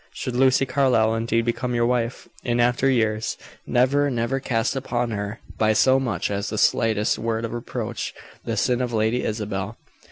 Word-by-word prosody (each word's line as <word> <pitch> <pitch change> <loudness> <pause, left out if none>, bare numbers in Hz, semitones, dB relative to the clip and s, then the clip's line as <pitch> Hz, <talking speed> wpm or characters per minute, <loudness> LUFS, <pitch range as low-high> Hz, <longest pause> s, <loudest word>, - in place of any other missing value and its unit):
Should 125 - -4
Lucy 130 +1 +4
Carlyle 130 -4 +2
indeed 115 0 0
become 120 +1 -1
your 120 0 +2
wife, 120 0 -1 0.2
in 120 0 0
after 120 +2 +3
years, 110 -4 0 0.3
never, 140 +4 +3
never 120 +1 -1
cast 120 -1 -1
upon 125 -3 -2
her, 100 +1 -4 0.2
by 110 0 +3
so 130 +4 +4
much 120 -6 -2
as 100 +1 -2
the 110 - -4
slightest 110 -1 +2
word 115 0 -1
of 115 - -5
reproach, 120 -1 -4 0.3
the - - -3
sin 125 0 +1
of 125 -2 -2
Lady 110 +3 +1
Isabel." 105 -1 -3
120 Hz, 170 wpm, -23 LUFS, 110-125 Hz, 0.3 s, Lucy